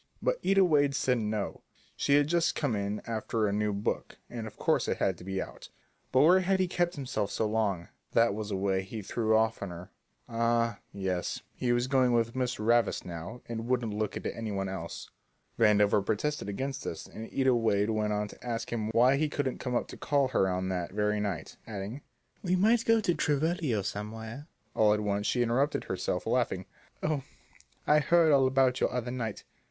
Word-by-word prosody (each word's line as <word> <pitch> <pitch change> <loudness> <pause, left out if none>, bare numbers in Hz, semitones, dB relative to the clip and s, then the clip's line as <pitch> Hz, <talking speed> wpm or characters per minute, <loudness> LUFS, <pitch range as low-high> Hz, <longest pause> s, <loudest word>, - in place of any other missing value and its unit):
But - - 0
Ida 195 0 +5
Wade 145 -4 +3
said 125 -3 +1
no, 105 -1 -3 0.3
she 140 - +2
had 145 0 +5
just 170 +2 +1
come 140 -7 0
in 100 +1 -2
after 110 -1 -1
a 100 - 0
new 105 0 +1
book, 100 +1 -3
and 115 -2 -5
of 105 - -11
course - - +1
it - - 0
had 95 - +1
to - - -10
be 95 +1 -3
out. - - -7 0.4
But 130 - +5
where 175 +5 +7
had 190 +1 +1
he 185 - +2
kept 175 0 0
himself 130 -7 -2
so 110 - 0
long? 105 -5 0 0.3
That 115 -2 +4
was 105 0 -4
the 100 - -1
way 95 0 +1
he 105 +3 -7
threw 110 +2 +1
off 110 0 +1
on 100 - -3
her; 85 +1 -9 0.4
ah, 115 -1 +1
yes, 95 -3 -3
he 125 - -1
was 120 0 +2
going 130 -2 +3
with 115 0 +1
Miss 125 -1 0
Ravis 115 +2 +2
now 90 +7 -7
and 115 0 -4
wouldn't 120 -4 0
look 105 0 -2
at - - -8
any 115 -2 -3
one 95 -1 -2
else. 95 -3 -6 0.5
Vandover 105 -2 +4
protested 130 +4 -1
against 135 +6 -3
this, 80 - -5
and 110 +1 -9
Ida 130 -1 +3
Wade 110 -3 +2
went 105 -1 0
on 105 0 0
to - - -14
ask 120 -1 -3
him 110 -2 -1
why 125 +4 +5
he 155 +1 +1
couldn't 140 -3 -2
come 125 -2 -2
up - - 0
to - - -9
call 145 -1 +1
on 130 - 0
her 95 -4 +1
that 90 -1 -3
very 105 0 +1
night, 100 -7 -4
adding: 105 +5 -5 0.4
"We 185 -3 +1
might 220 +5 +3
go 225 -1 +4
to 180 - +2
the - - -5
Tivoli 155 0 +1
or 105 -3 0
somewhere." 110 +7 -6 0.3
All 105 -1 +4
at - - -2
once 105 0 -1
she 120 - +2
interrupted 130 +5 +1
herself, - - -2
laughing, - - 0 0.4
"Oh, 150 -2 0 0.6
I 150 +1 +5
heard 165 +2 +4
all 135 -2 +5
about 130 -1 +2
you - - +4
the - - -8
other 125 -1 -2
night. 115 -4 -4
115 Hz, 210 wpm, -30 LUFS, 105-135 Hz, 0.6 s, where